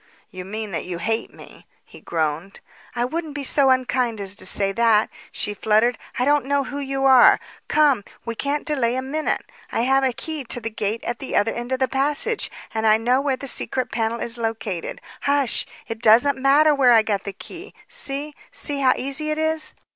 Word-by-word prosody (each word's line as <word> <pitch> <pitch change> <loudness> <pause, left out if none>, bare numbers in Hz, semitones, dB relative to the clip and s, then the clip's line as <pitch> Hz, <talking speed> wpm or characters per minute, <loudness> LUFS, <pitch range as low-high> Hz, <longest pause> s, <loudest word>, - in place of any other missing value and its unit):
"You 185 -1 -8
mean 215 +1 -5
that 170 - -3
you 180 -1 -4
hate 225 +6 -2
me," - - -15 0.2
he - - -15
groaned. 160 +3 -2 0.4
"I 240 0 +1
wouldn't 315 +2 -4
be 285 - -4
so 275 0 +3
unkind 250 -3 +1
as 195 -1 -4
to 205 - -3
say 195 -1 +1
that," 225 0 +3 0.2
she 210 - -2
fluttered. 220 +4 +2 0.2
"I 250 - +1
don't 290 -1 +3
know 280 0 +2
who 285 +1 -6
you 270 -1 -2
are. 260 -2 +7 0.3
Come; 290 -8 +3 0.2
we 230 - -3
can't 280 +5 -2
delay 260 -6 0
a 260 - -2
minute. 305 +4 -2 0.3
I - - 0
have 270 +2 +3
a 260 - +2
key 305 +4 -5
to 245 - 0
the 225 -1 -5
gate 215 +1 -2
at 240 0 -3
the 270 - -5
other 205 +2 +2
end 240 +1 -6
of 260 - +1
the 260 0 +1
passage 295 - 0 0.2
and 220 0 0
I 215 0 +6
know 245 +4 +2
where 275 -2 0
the 275 - -7
secret 255 -1 -1
panel 230 0 -1
is 235 0 -3
located. 215 -6 -3 0.2
Hush! 280 -3 +1 0.2
It 225 0 -6
doesn't 245 +6 +5
matter 285 +3 +4
where 260 -4 +5
I 225 -1 +6
got 205 -2 -1
the 200 - -4
key. 355 - -10
See! 295 - -3 0.2
See 290 -2 -2
how 260 -2 +4
easy 275 +4 -3
it 305 - -1
is?" 315 0 0
255 Hz, 210 wpm, -22 LUFS, 220-280 Hz, 0.4 s, are